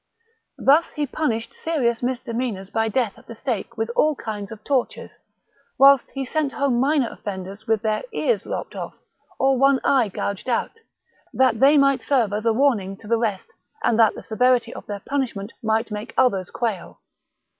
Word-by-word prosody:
Thus 295 +5 +3
he 300 -1 -1
punished 240 -5 -2
serious 250 -8 -1
mis 250 0 -1
demeanours 230 -6 -4
by 225 0 +1
death 230 -2 -1
at - - -22
the 230 - -9
stake 235 -1 -4
with 225 +1 -2
all 305 0 +3
kinds 210 -4 -6
of 215 -1 -10
tortures, 270 -4 -2 0.6
while 275 0 +8 0.2
he 270 0 -2
sent 290 +1 -1
home 270 -4 +1
minor 275 -2 +2
offenders 195 +2 -7
with 220 -1 +1
their 215 -1 0
ears 470 +2 0
lopped - - -4
off - - -6 0.4
or 270 0 +2
ope 275 -1 +5
eye 255 -6 +3
gouged 200 +4 -4
out, 250 - -1 0.6
that 255 -4 +3
they 280 +4 +6
might 275 -2 +3
serve 240 -8 +1
as 215 +2 -2
a - - +5
warning 220 -6 +1
to 210 - -14
the 230 +1 +2
rest 210 -5 -3 0.3
and 235 - +2
that 225 -2 +5
the - - -9
severity 250 +2 +2
of - - -10
their 205 -1 -5
punishment 235 -7 -3
might 225 +1 0
make 210 +1 -6
others 195 -8 +2
quail. 220 -7 -4
235 Hz, 180 wpm, -23 LUFS, 215-270 Hz, 0.6 s, while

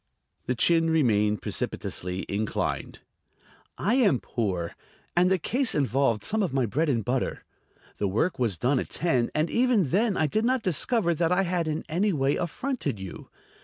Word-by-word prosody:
The 125 - 0
chin 165 +6 +3
remained 105 - +2
precipitously 90 +1 -3
inclined. 105 +2 -3 0.8
"I 210 - +1
am 215 - +3
poor, 95 -7 -3 0.4
and 180 +1 +4
the 190 - +3
case 250 - +1
involved 135 -6 +1
some 220 +1 0
of 175 -9 -1
my 130 -2 +2
bread 150 +9 0
and 115 -6 0
butter. 125 +1 -1 0.5
The 100 - 0
work 115 - 0
was 115 -8 0
done 130 - +1
at - - -4
ten, 130 -8 0
and 155 +2 +1
even 235 - +2
then 205 - +1
I 160 - +2
did 215 +9 0
not 255 0 +1
discover 185 - +1
that 165 +1 0
I 185 +2 +3
had 175 -2 -1
in 155 0 -3
any 185 +5 +1
way 135 -2 +1
affronted 175 - -3
you. 95 -2 -8
155 Hz, 170 wpm, -26 LUFS, 120-190 Hz, 0.8 s, and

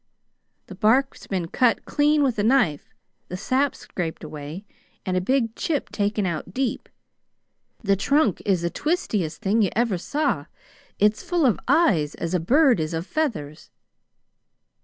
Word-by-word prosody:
"The - - -10
bark's 225 +8 +1
been 180 -4 -2
cut 245 +3 +2
clean 295 0 +2
with 250 -6 0
a - - +2
knife, 220 - +2 0.4
the 180 - -5
sap 265 +8 0
scraped 170 -3 -5
away, 155 +5 -8 0.4
and 185 - -1
a 185 - +1
big 230 +2 0
chip 300 -4 -2
taken 205 0 0
out 175 +1 -4
deep. 265 -2 -2 0.9
The 200 -2 +3
trunk 250 - +1
is 185 -4 +1
the 170 - -1
twistiest 210 - -2
thing 210 +4 +2
you 200 - +3
ever 225 -6 +1
saw. 275 - -1 0.5
It's 210 +1 +2
full 345 -4 0
of 240 - +3
eyes 170 - +3
as 170 +1 -4
a 180 - +2
bird 255 - +4
is 155 +1 -2
of 165 +2 -3
feathers!" 200 - -3
210 Hz, 155 wpm, -24 LUFS, 175-270 Hz, 0.9 s, bird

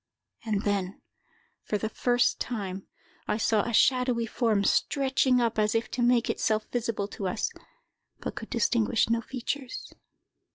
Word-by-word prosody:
And 210 -2 -1
then, 200 -2 -1 0.6
for 210 - -2
the 220 - -2
first 245 +2 +1
time, 195 -5 -4 0.4
I 210 - 0
saw 220 -1 +2
a 235 - -3
shadowy 250 0 +3
form, 220 -3 +1
stretching 265 +2 +2
up 230 -2 +1
as 215 +1 +2
if 225 - -1
to 245 - -2
make 240 -1 +3
itself 215 0 0
visible 230 -4 -1
to 195 - -4
us, 180 - -1 0.7
but - - -4
could - - -8
distinguish 230 - +2
no 230 0 +2
features. 260 +2 -5
230 Hz, 150 wpm, -28 LUFS, 210-245 Hz, 0.7 s, shadowy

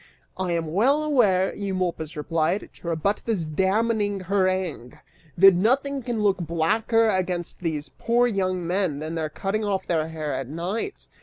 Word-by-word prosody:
"I 185 -2 -2
am 165 -2 -2
well 270 - +3
aware," 210 -11 +3
Eumolpus 185 -6 -3
replied, 165 +5 -1
to - - -12
rebut 170 +5 0
this 210 -8 -1
damning 205 +5 0
harangue, 185 -8 -1 0.4
"that 195 +2 +8
nothing 270 +9 +1
can 235 -3 -2
look 200 -2 +3
blacker 210 +8 +1
against 185 -4 -1
these 160 -4 -3
poor 240 +1 +1
young 185 -5 -1
men 180 -4 0
than 155 +2 -5
their 160 -2 -2
cutting 200 +6 -2
off 200 -2 -1
their 160 -2 0
hair 155 -3 -4
at 130 -1 -3
night. 185 - -4
185 Hz, 155 wpm, -24 LUFS, 165-215 Hz, 0.4 s, that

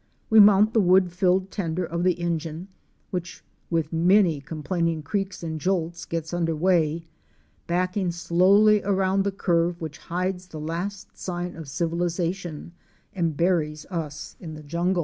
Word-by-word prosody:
We 220 - +7
mount 210 +1 +7
the 225 - +4
wood 185 -1 +4
filled 185 +1 +1
tender 175 -2 -2
of 170 +1 -3
the 185 0 +4
engine, 170 +1 -3 0.4
which 180 -1 -5 0.3
with 165 -2 -1
many 175 -2 +4
complaining 160 +2 -2
creaks 195 +3 -3
and 160 -2 -4
jolts 170 -2 -1
get 165 0 -4
under 165 -2 0
way, 165 -1 +1 0.6
backing 180 +1 0
slowly 195 +5 +4
around 195 0 +1
the 200 - 0
curve 175 -2 0
which 155 -3 -6
hides 180 +1 -3
the 160 -3 -8
last 175 +6 -5
sign 175 -1 -4
of 160 -4 -8
civilization 170 +2 -2 0.4
and 165 -5 -1
buries 160 -4 0
us 155 -5 -5
in 160 -4 -8
the 155 - -10
jungle. 170 +5 0
175 Hz, 150 wpm, -25 LUFS, 165-185 Hz, 0.6 s, We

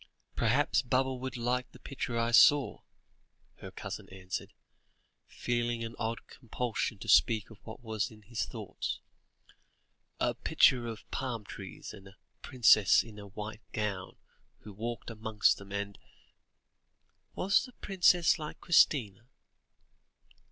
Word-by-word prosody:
"Perhaps 130 +6 +2
Baba 130 +1 +1
would 130 0 -5
like 125 +1 -1
the - - -15
picture 130 -3 -4
I 115 0 +1
saw," 140 +4 +6 0.8
her - - -9
cousin - - -7
answered, 95 -1 -6 0.8
feeling 120 -1 -2
an 115 0 -5
odd 115 0 -3
compulsion 120 -2 -3
to 115 - -10
speak 110 +1 +4
of 110 - -14
what 110 +2 -9
was 110 -2 -2
in 110 -1 -16
his 115 +2 -3
thoughts: - - -5 1.2
"a - - +1
picture 120 -2 +3
of 110 -3 -8
palm 125 -5 -3
trees, - - -9
and 95 0 -12
a 95 +2 -17 0.2
princess 110 -7 +5
in 110 -2 -12
a 100 - -9
white 105 +2 -7
gown, 100 -3 -3 0.4
who 105 - -11
walked 115 +3 -5
amongst 110 -1 +1
them, 100 0 -12
and 100 0 -4 0.7
" - - -44
"Was 195 +6 +2
the 250 - -14
princess 180 -5 +3
like 150 -1 -7
Christina?" 120 - +3
115 Hz, 135 wpm, -31 LUFS, 105-125 Hz, 1.2 s, saw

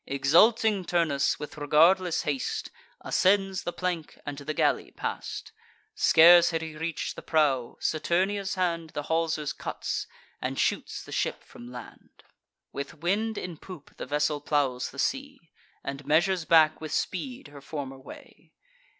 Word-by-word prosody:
Exulting 195 - +4
Turnus, 165 -6 +1
with 150 +1 -8
regardless 165 +5 +3
haste, 140 -3 -3 0.3
Ascends 195 0 +2
the 175 - -3
plank, 175 -3 -4
and 145 - -4
to 145 - -9
the 155 +1 -4
galley - - +1
pass'd. - - -5 0.4
Scarce 170 +1 +7
had 165 -1 -2
he 160 -1 -7
reach'd 160 +1 -4
the - - -8
prow: 140 -6 +1
Saturnia's 190 +5 0
hand 170 -3 -1
The 145 - -2
haulsers 160 -2 -1
cuts, - - -4 0.3
and - - -3
shoots - - -1
the - - -12
ship - - -2
from 120 +1 -12
land. 125 -2 -12 0.5
With 140 +4 -5
wind 205 +7 -1
in 175 -3 -5
poop, 180 -5 -12
the - - -6
vessel 145 0 0
plows 140 -4 0
the 140 - -14
sea, 275 - -2 0.4
And 140 +1 -5
measures 165 +4 +2
back 160 -2 +5
with 155 - -6
speed 245 - -3
her 145 -1 -12
former 140 -2 -6
way. 130 - -14
160 Hz, 150 wpm, -27 LUFS, 145-180 Hz, 0.5 s, Scarce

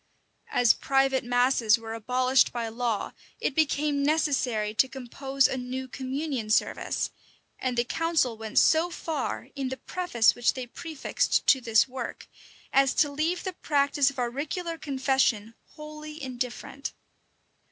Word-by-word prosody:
As 240 -3 +4
private 270 -1 +1
masses 245 -2 +3
were 225 -1 -7
abolished 250 +3 +2
by 235 -2 -3
law, 230 -2 -2 0.3
it - - -1
became 295 -1 +1
necessary 270 -8 +1
to 265 - +3
compose 270 +1 0
a 265 - -3
new 255 +1 -5
communion 265 -2 -4
service; 215 - 0 0.5
and 255 -2 -2
the 240 - +3
council 320 -3 0
went 220 +2 -7
so 325 +2 +5
far, 320 -5 -4
in 275 -2 -3
the 260 - -5
preface 340 -13 +2
which 240 - +1
they 255 -1 -4
prefixed 315 +4 -1
to 265 - +5
this 225 -1 +3
work, 260 0 -6 0.5
as 270 -1 +4
to 290 -2 +3
leave 320 +5 -1
the 375 - -3
practice 285 -3 +2
of 275 - -11
auricular 290 +8 -3
confession 265 -7 0 0.2
wholly 305 0 -9
indifferent. 255 0 -5
265 Hz, 140 wpm, -27 LUFS, 245-295 Hz, 0.5 s, so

